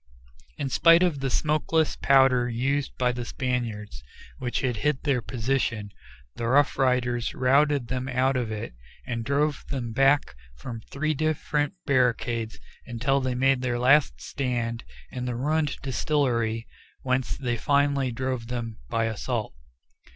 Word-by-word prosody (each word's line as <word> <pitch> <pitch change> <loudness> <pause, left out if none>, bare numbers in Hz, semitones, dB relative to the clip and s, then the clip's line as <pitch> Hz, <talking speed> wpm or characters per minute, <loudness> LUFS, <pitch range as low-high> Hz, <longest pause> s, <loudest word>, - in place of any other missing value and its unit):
In 140 - -2
spite 165 +5 +6
of 170 -6 +1
the 135 0 -1
smokeless 155 +3 +1
powder 130 -3 +4
used 135 +4 -1
by 125 -1 +2
the 120 0 -4
Spaniards, 120 -5 -3 0.4
which 120 -1 -2
hid 130 +3 -1
their 140 -5 +1
position, 115 -3 -2 0.5
the 115 - -2
Rough 140 +4 +3
Riders 125 -3 0
routed 140 0 +3
them 130 +1 -3
out 130 +1 +1
of 120 -3 -1
it, 105 - -5 0.3
and 115 -2 -3
drove 145 +4 0
them 125 -4 -3
back 135 +3 +3 0.2
from 115 - -7
three 155 +2 -1
different 155 +2 -1
barricades 120 -4 0 0.3
until 130 +3 0
they 130 -1 -1
made 135 0 +2
their 125 -1 -1
last 130 - +4
stand 120 - -3 0.3
in 125 -1 -4
the 125 -1 -2
ruined 150 +3 0
distillery, 120 -5 0 0.4
whence 130 0 -1
they 120 -3 -1
finally 140 0 +1
drove 130 -1 -3
them 115 -2 -5
by 115 0 0
assault. 110 -6 -3
130 Hz, 140 wpm, -26 LUFS, 120-140 Hz, 0.5 s, spite